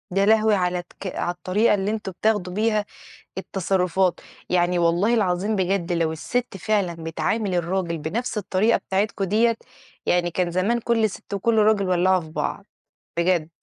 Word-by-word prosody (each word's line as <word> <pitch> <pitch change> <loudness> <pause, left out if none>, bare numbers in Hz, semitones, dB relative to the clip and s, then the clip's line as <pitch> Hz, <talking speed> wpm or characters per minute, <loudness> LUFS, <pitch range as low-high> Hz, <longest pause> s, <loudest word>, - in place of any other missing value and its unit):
يا 195 0 +3
لهوي 220 0 +4
على 180 -1 0
الك 180 +2 -8
على 175 - -1
الطريقة 185 +5 +1
اللي 200 +1 -1
أنتم 215 -3 -4
بتاخدوا 190 -1 0
بيها 215 0 +1 0.5
التصرفات! 190 -1 0 0.3
يعني 175 0 +2
والله 175 +7 +2
العظيم 200 0 +1
بجد 185 -1 0
لو 165 -2 +1
الست 230 +7 -3
فعلًا 190 -2 0
بتعامل 190 +5 -1
الراجل 175 -1 -1
بنفْس 215 +9 -3
الطريقة 205 +3 +2
بتاعتكم 195 +1 -1
ديّة، 225 +4 +2 0.5
يعني 175 -1 +2
كان 175 +1 -1
زمان 200 +7 +1
كلّ 225 -2 +1
ست 195 +2 -8
وكلّ 220 +3 +1
راجل 210 -3 +3
ولعوا 185 +1 +3
في 160 -1 -11
بعض، - - -3 0.5
بجد. 170 -2 +2
190 Hz, 155 wpm, -23 LUFS, 175-215 Hz, 0.5 s, لهوي